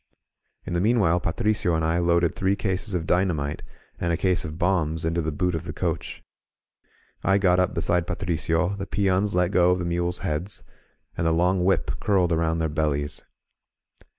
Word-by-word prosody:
In - - -4
the 85 - +1
meanwhile 100 -6 +3
Patricio 90 +1 0
and 80 0 0
I 80 +2 +1
loaded 85 -1 +2
three 95 +1 +1
cases 100 0 -2
of 85 -2 -2
dynamite 85 -6 0 0.4
and 85 - 0
a 85 - +1
case 95 0 +1
of 80 0 -6
bombs 80 -3 0
into 85 +1 0
the 80 0 -2
boot 90 +4 -1
of 80 - -3
the - - -6
coach. - - -3 1.0
I 100 0 +3
got 90 -2 +3
up 90 - +1
beside 90 0 +1
Patricio, 85 -2 0
the 100 0 -5
peons 100 0 +1
let 90 0 +2
go 90 -3 +4
of 90 - +3
the 90 - -3
mules' 85 +1 -1
heads, 80 +7 -3 0.5
and 80 - 0
the - - +3
long 90 +2 +2
whip 95 +1 0
curled 95 -4 +2
around 80 0 +1
their 80 -1 0
bellies. 75 -1 -2
85 Hz, 180 wpm, -25 LUFS, 80-95 Hz, 1.0 s, go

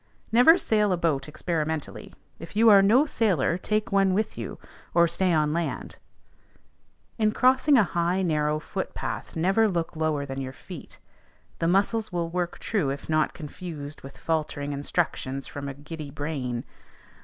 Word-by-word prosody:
Never 250 +9 +7
sail 210 - +2
a 180 - +2
boat 150 -5 0
experimentally: 160 -1 -3 0.3
if 165 +4 -10
you 225 +1 +6
are 200 -1 +8
no 230 +9 +5
sailor, 190 - +1
take 215 +4 -1
one 195 -1 +3
with 215 +2 -1
you, - - -6 0.4
or 170 0 +6
stay 185 +2 +1
on 150 -2 +2
land. 165 -6 -3 1.2
In 215 -1 +3
crossing 260 +5 +4
a 225 - +6
high 175 +1 0
narrow 150 -3 +1
foot - - -5
path, - - -5
never 195 +7 +3
look 170 -4 -2
lower 155 -2 0
than 135 0 -5
your 130 0 -5
feet; 175 +2 -11 0.6
the 165 - +1
muscles 205 +5 +1
will 170 -1 -2
work 175 0 -2
true 195 -11 -1
if 140 +3 -5
not 155 -1 +1
confused 155 -2 -8
with 135 - -11
faltering 150 -3 -2
instructions 140 -2 -2
from 140 -1 -6
a 135 - -7
giddy 150 +1 -8
brain. 140 -5 -3
165 Hz, 160 wpm, -26 LUFS, 150-195 Hz, 1.2 s, are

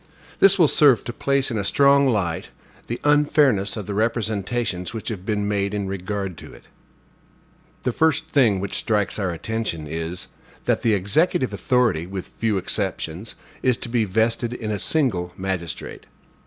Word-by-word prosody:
This 195 0 +6
will 170 -4 +6
serve 140 -5 +5
to 120 - -5
place 140 0 0
in 110 - -1
a - - -1
strong 140 +5 +4
light 95 -9 -1 0.4
the 120 - -4
unfairness 145 -8 +3
of 105 - -5
the 100 - -4
representations 110 -2 -1
which 110 - -4
have 100 -4 -6
been 105 -2 0
made 100 0 -1
in 100 -1 -2
regard 95 -1 -4
to - - -11
it. - - -16 1.2
The 125 - +1
first 160 +4 +2
thing 120 -11 +3
which 100 +1 -4
strikes 105 -1 0
our 95 -2 0
attention 85 -2 -3
is, 80 +3 -4 0.4
that - - +1
the 110 -3 +3
executive 120 - +1
authority, 100 -6 +1
with 95 -1 -5
few 110 -3 -1
exceptions, 95 0 -3 0.3
is 125 -2 +2
to 120 - -6
be 115 -1 +2
vested 115 +4 0
in 110 -3 -4
a 105 - -2
single 95 - 0
magistrate. 95 -4 -5
105 Hz, 165 wpm, -23 LUFS, 95-125 Hz, 1.2 s, This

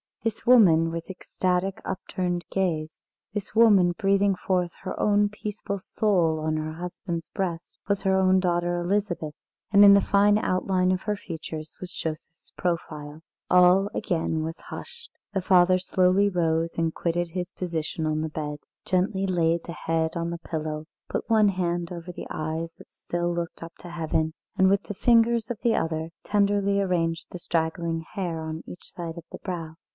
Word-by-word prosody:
This 225 -1 -2
woman 170 -10 +6
with 165 +2 -5
ecstatic, 185 0 -1
upturned 180 -2 -3
gaze, 160 -5 -1 0.3
this 210 0 -5
woman 200 -6 +6
breathing 195 0 +3
forth 180 -1 0
her 185 - -4 0.4
peaceful 210 -1 -4
soul 180 -5 +1
on 155 0 -1
her 155 0 -3
husband's 175 0 -5
breast, 175 -4 -4
was 200 -1 +1
her 190 -1 +2
own 190 0 +4
daughter 175 -1 0
Elizabeth, 175 -4 -1 0.4
and 205 0 +7
in 200 - +10
the 200 - +6
fine 205 +1 +4
outline 185 -2 +1
of 185 0 0
her 210 -1 -1
features 160 -4 -7
was 180 -1 -6
Joseph's 160 0 -6
profile. 155 -3 -3 0.3
All 180 +2 +5
again 160 -2 -1
was 165 +1 -5
hushed. 475 0 -10 0.2
The 195 - 0
father 185 0 +5
slowly 185 +2 +3
rose 165 -2 0
and 165 -1 0
quitted 175 0 -1
his 180 +1 -4
position 165 -2 -3
on 155 0 0
the 160 - -2
bed, 150 -1 -4 0.3
gently 190 +1 +1
laid 170 -2 +1
the 170 - -7
head 160 0 -1
on 170 0 -2
the 170 - -5
pillow, 155 -2 -4 0.2
put - - -3
one 215 -2 +5
hand 175 -2 -1
over 175 0 -6
the - - -8
eyes 160 +2 -3
that - - -16
still 175 0 -2
looked 170 -1 -4
up 165 0 -8
to 175 - -9
heaven, 160 -1 -1 0.2
and 190 0 +4
with 200 +1 +2
the 205 - -6
fingers 230 +1 +3
of 230 - -4
the 235 -2 +3
other 160 0 -1
tenderly 200 -1 +2
arranged 170 -3 0
the 180 - -8
straggling 165 0 -1
hair 175 -5 -2
on 160 0 -5
each 180 - -10
side 170 -1 -6
of 170 - -9
the - - -8
brow. 165 -4 -5
175 Hz, 170 wpm, -26 LUFS, 165-195 Hz, 0.4 s, in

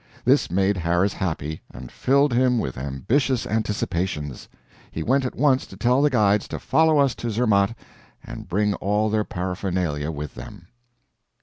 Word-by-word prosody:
This - - +3
made 95 +2 +1
Harris 85 +3 +1
happy, 80 -4 -3
and 65 -2 -10
filled 140 0 +2
him 125 0 +3
with 65 - -2
ambitious 110 - -1
anticipations. 90 - -2 0.4
He 80 - -5
went 135 - +2
at 125 - -4
once 135 -1 +2
to 95 - -12
tell 125 +6 +2
the 150 - +4
guides 105 -5 +2
to - - -5
follow 160 -1 +3
us 140 -3 +3
to 120 - -5
Zermatt 110 -1 +2 0.5
and - - -9
bring 105 +3 +1
all 105 +2 0
their 110 0 +1
paraphernalia 90 -5 -3
with 75 -2 -5
them. 90 -5 -11
100 Hz, 160 wpm, -23 LUFS, 85-125 Hz, 0.5 s, the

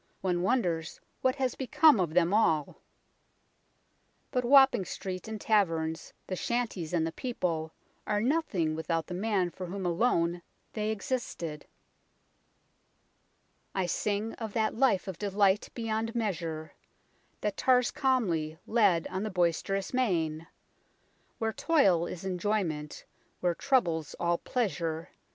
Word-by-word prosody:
One 180 -2 0
wonders 175 -7 0 0.2
what 260 0 +2
has 260 -3 0
become 300 -1 +4
of 170 -3 -1
them 180 +1 +3
all. 160 -9 +2 1.5
But 250 - 0
Wapping 265 -4 +6
streets 185 +3 -6
and 220 -1 -5
taverns, 165 -7 0
the 185 - -3
shanties 220 -7 -2
and 170 -2 +1
the 165 - -2
people, 165 -8 -2 0.4
are 210 -1 +1
nothing 220 - +1
without 160 +1 -1
the 180 - -7
man 190 -2 0
for 185 +1 -7
whom 190 +1 -5
alone 175 -2 +1 0.3
they 215 -1 -1
existed 200 - -4 1.4
" - - -43
I 190 -2 +1
sing 210 +5 -1
of 220 -3 -5
that 220 -1 +1
life 230 -6 +2
of 185 -3 -6
delight 200 -1 +2
beyond 225 0 -2
measure 165 -8 -3 0.7
That 210 -1 -1
tars 250 +1 +3
calmly 175 - 0
lead 200 -8 +3
on 190 +1 -2
the 215 - -2
boisterous 185 +2 0
main; 165 -10 0 0.9
Where 225 -1 -1
toil 195 - +3
is 180 +1 -7
enjoyment, 180 -5 -2 0.3
where 175 -1 +1
trouble's 170 - 0
all 170 0 +1
pleasure. 170 -9 -2
190 Hz, 130 wpm, -30 LUFS, 170-225 Hz, 1.5 s, Wapping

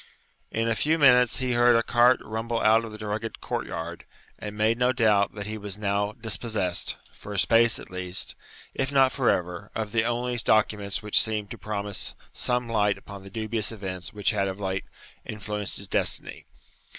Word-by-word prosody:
In 115 +1 -1
a 115 - +2
few 155 +8 +1
minutes 125 -5 +5
he 130 -1 -1
heard 120 0 +5
a 115 - +3
cart 120 +2 +4
rumble 115 +2 -3
out 110 +1 +4
of 110 -2 -7
the 110 - -7
rugged 110 +2 -4
court - - -3
yard, 85 +1 -6 0.3
and 105 0 -7
made 110 +2 +2
no 125 0 +4
doubt 105 -5 +2
that 100 -1 -5
he 110 +1 -5
was 100 -1 -5
now 100 0 -1
dispossessed, 105 -6 -2 0.2
for 105 - -9
a - - -4
space 115 +3 +4
at - - -10
least, 90 0 -1 0.4
if 135 +1 -2
not 135 -2 +5
for 130 -3 +1
ever, 90 +3 -1
of 110 -2 -3
the 110 0 +2
only 120 +1 -1
documents 105 -3 +1
which 105 - +5
seemed 105 -2 -1
to - - -6
promise 105 -2 -3 0.2
some 125 0 -1
light 105 -3 +1
upon 100 -1 -10
the 95 - -11
dubious 110 +1 -2
events 95 -3 -6
which 105 -3 0
had 100 -3 0
of 95 +1 -5
late 95 -1 -2 0.4
influenced 105 -1 -3
his 100 - -2
destiny. - - -2
110 Hz, 190 wpm, -26 LUFS, 100-115 Hz, 0.4 s, minutes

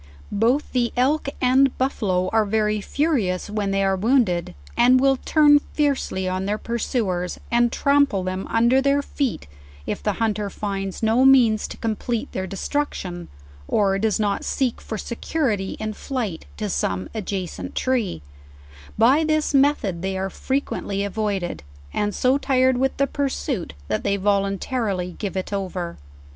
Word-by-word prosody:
Both 235 +8 +1
the 240 -2 +1
elk 275 +3 +2
and 260 +1 +4
buffalo 195 -9 0
are 220 -1 +4
very 210 0 0
furious 210 - 0
when 210 -2 -1
they 195 0 +1
are 195 0 +2
wounded, 190 - +1 0.2
and 250 +2 +5
will 270 0 +3
turn 295 +1 +5
fiercely 280 -11 -1
on 185 +1 -2
their 210 +1 0
pursuers, 215 -6 -2
and 240 0 +3
tram 285 +1 +3
ple 195 -7 -2
them 185 +1 -3
under 235 +4 +3
their 280 +1 +2
feet 275 -4 -2 0.4
if - - -3
the - - 0
hunter 215 -2 -1
finds 195 -1 -4
no 225 +4 +4
means 245 -5 +5
to - - -9
complete 225 +1 -2
their 190 0 -3
destruction, 190 - -3 0.4
or 195 -2 +2
does 220 0 +1
not 205 -2 0
seek 260 -4 -1
for 220 - -5
security 230 -4 -2
in 215 0 -3
flight 220 - -4
to 210 - -2
some 95 - -1
adjacent 185 - -4
tree; 235 - -1 0.7
by 260 +8 +5
this 310 -1 +1
method 270 -11 +2
they 190 0 -2
are 190 0 -2
frequent 275 +7 -2
ly 200 - -3
avoided, 200 - -2 0.3
and 205 -1 -1
so 260 +2 +2
tired 260 -2 +3
with 265 0 0
the 275 - +3
pursuit, 270 - -3
that 110 - -1
they 200 - +1
volunta 200 +5 0
rily 180 -4 -2
give 195 -3 -3
it 190 +2 -3
over. 185 - -4
215 Hz, 155 wpm, -23 LUFS, 195-260 Hz, 0.7 s, and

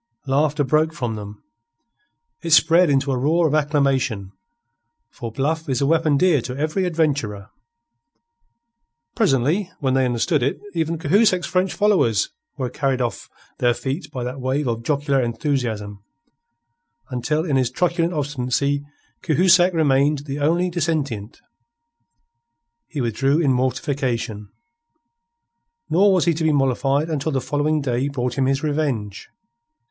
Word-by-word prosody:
Laughter 145 +2 +1
broke 155 +4 +1
from 120 -5 -3
them. 105 -1 -9 1.0
It 170 - -4
spread 165 +2 +5
into 140 0 +1
a 130 - 0
roar 165 +6 +2
of 150 - -2
acclamation; 140 -9 0 0.8
for 115 -3 -7
bluff 155 +6 -2
is 130 -2 0
a 140 - +1
weapon 155 -1 +2
dear 170 -4 +3
to 125 +2 -6
every 155 +6 -1
adventurer. 140 - -1 1.6
Presently, 150 +10 +1
when 135 -3 0
they 130 0 +3
understood 125 +5 0
it, 135 +3 -1
even 165 -1 -1
Cahusac's 185 +3 +2
French 185 0 0
followers 185 - +2 0.3
were 130 -3 -2
carried 135 -1 -1
off 120 -5 -3 0.3
their 120 -1 +2
feet 140 +6 -4
by 130 -4 -4
that 125 +2 -5
wave 135 +3 -1
of 115 -1 -2
jocular 140 +1 0
enthusiasm, 115 -6 -3 1.1
until 150 +6 -1
in 145 -5 0
his 130 -2 +2
truculent 170 +4 0
obstinacy 140 -2 -1 0.4
Cahusac 180 +3 +4
remained 145 -2 +2
the 140 0 -4
only 170 +5 +1
dissentient. 140 - -2 1.5
He 150 -4 -4
withdrew 135 +6 +1
in 140 -6 +2
mortification. 125 -4 -2 1.4
Nor 195 +5 +5
was 185 -4 +2
he 170 - +3
to 160 +1 -3
be 160 - +3
mollified 135 +1 +1
until 155 -1 -2
the 135 - 0
following 150 +3 0
day 130 0 -1
brought 125 -3 -3
him 130 - +2
his 135 +2 0
revenge. 140 -10 -2
140 Hz, 135 wpm, -21 LUFS, 125-160 Hz, 1.6 s, spread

